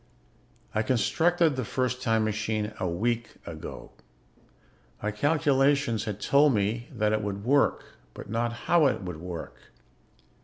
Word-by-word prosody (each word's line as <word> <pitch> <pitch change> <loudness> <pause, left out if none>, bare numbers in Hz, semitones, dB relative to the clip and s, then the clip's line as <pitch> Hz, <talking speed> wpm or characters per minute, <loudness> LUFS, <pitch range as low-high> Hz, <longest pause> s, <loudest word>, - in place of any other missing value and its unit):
"I 110 - +1
constructed 160 +7 +2
the 130 - -2
first 125 +2 -2
time 115 -3 +2
machine 110 0 -2
a 95 -2 -1
week 115 +7 -2
ago. - - -8 1.1
My 105 - 0
calculations 140 -3 +2
had 105 -2 -4
told 140 +3 +4
me 105 +4 -1
that 110 -3 0
it 110 - +1
would 100 -1 -4
work, 140 +2 +3 0.3
but - - -9
not 115 +3 -1
how 170 -4 +5
it 125 - -1
would 90 -3 -5
work. 85 0 -7
115 Hz, 140 wpm, -27 LUFS, 105-135 Hz, 1.1 s, how